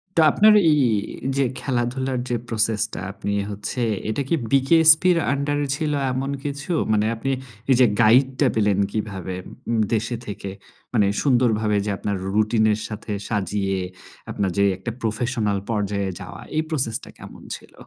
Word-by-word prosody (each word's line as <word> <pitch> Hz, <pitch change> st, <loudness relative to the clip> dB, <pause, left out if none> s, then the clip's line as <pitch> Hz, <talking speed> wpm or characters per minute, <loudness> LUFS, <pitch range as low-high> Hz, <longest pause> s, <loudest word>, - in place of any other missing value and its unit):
তো 165 Hz, -, +5 dB
আপনার 215 Hz, +5 st, +6 dB, 0.2 s
এই 150 Hz, -, +3 dB, 0.6 s
যে 140 Hz, -, +3 dB, 0.2 s
খেলাধুলার 130 Hz, +1 st, -1 dB
যে 120 Hz, -, 0 dB
প্রসেসটা, 110 Hz, -1 st, 0 dB
আপনি 100 Hz, +1 st, -4 dB, 0.2 s
হচ্ছে 105 Hz, +5 st, -5 dB, 0.3 s
এটা 110 Hz, -, -1 dB
কি -, -, +3 dB, 0.2 s
বিকেএসপি 160 Hz, +5 st, +6 dB
এর 170 Hz, -, +1 dB
আন্ডারে 145 Hz, +1 st, -1 dB
ছিল 155 Hz, 0 st, -2 dB, 0.2 s
এমন 135 Hz, +2 st, -2 dB
কিছু? 145 Hz, +3 st, -4 dB, 0.2 s
মানে 105 Hz, 0 st, +2 dB
আপনি 125 Hz, +4 st, -3 dB, 0.4 s
এই -, -, +6 dB
যে 130 Hz, -, +7 dB, 0.2 s
গাইডটা 130 Hz, +5 st, +4 dB
পেলেন 105 Hz, -3 st, +2 dB
কীভাবে 95 Hz, -4 st, -4 dB, 0.3 s
উম 115 Hz, -1 st, +1 dB
দেশে 115 Hz, +2 st, 0 dB
থেকে? 100 Hz, -1 st, -6 dB, 0.4 s
মানে 105 Hz, -4 st, +4 dB, 0.2 s
সুন্দরভাবে 110 Hz, -6 st, +2 dB
যে -, -, -2 dB
আপনার 100 Hz, 0 st, -2 dB, 0.2 s
রুটিনের 110 Hz, 0 st, +2 dB
সাথে 105 Hz, 0 st, -7 dB, 0.2 s
সাজিয়ে, 100 Hz, -2 st, -1 dB, 0.5 s
আপনার 100 Hz, -2 st, -1 dB
যে 100 Hz, -, +4 dB
একটা 115 Hz, -, -5 dB
প্রফেশনাল 110 Hz, -2 st, -1 dB
পর্যায়ে 100 Hz, -3 st, -1 dB
যাওয়া -, -, -9 dB
এই 155 Hz, -, +2 dB
প্রসেসটা 130 Hz, -8 st, -2 dB
কেমন -, -, -12 dB, 0.2 s
ছিল? -, -, -20 dB
115 Hz, 150 wpm, -23 LUFS, 105-135 Hz, 0.6 s, যে